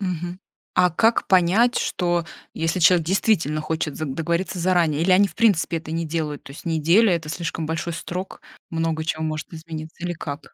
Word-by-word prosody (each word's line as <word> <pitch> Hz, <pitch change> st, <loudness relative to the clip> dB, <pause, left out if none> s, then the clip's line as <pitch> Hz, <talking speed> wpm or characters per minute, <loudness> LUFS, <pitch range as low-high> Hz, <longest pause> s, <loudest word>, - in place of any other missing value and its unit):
мгм, 180 Hz, -1 st, -4 dB, 0.3 s
а 180 Hz, 0 st, +4 dB
как 225 Hz, +8 st, +2 dB
понять, 190 Hz, +7 st, +4 dB
что 175 Hz, -2 st, 0 dB, 0.3 s
если 165 Hz, +2 st, -1 dB
человек 170 Hz, -1 st, +5 dB
действительно 175 Hz, -, +1 dB
хочет 155 Hz, -1 st, -3 dB
за 155 Hz, -, -3 dB
договориться 170 Hz, +6 st, -2 dB
заранее, 170 Hz, -4 st, +2 dB
или 185 Hz, -, +2 dB
они 200 Hz, +2 st, +5 dB
в 170 Hz, -, -15 dB
принципе 195 Hz, -7 st, +2 dB
это 160 Hz, 0 st, -8 dB
не 165 Hz, +1 st, -1 dB
делают? 150 Hz, -2 st, -3 dB
То 140 Hz, -, -10 dB
есть 140 Hz, -, -12 dB
неделя- 170 Hz, +6 st, +3 dB
это 160 Hz, -2 st, -4 dB
слишком 165 Hz, 0 st, -3 dB
большой 165 Hz, +2 st, -3 dB
срок 180 Hz, +3 st, -6 dB, 0.3 s
много 165 Hz, -1 st, -1 dB
чего 160 Hz, -1 st, -2 dB
может 155 Hz, 0 st, -4 dB
измениться 160 Hz, 0 st, -8 dB
или 175 Hz, -, -1 dB
как? 145 Hz, -3 st, -7 dB
165 Hz, 180 wpm, -23 LUFS, 160-180 Hz, 0.3 s, человек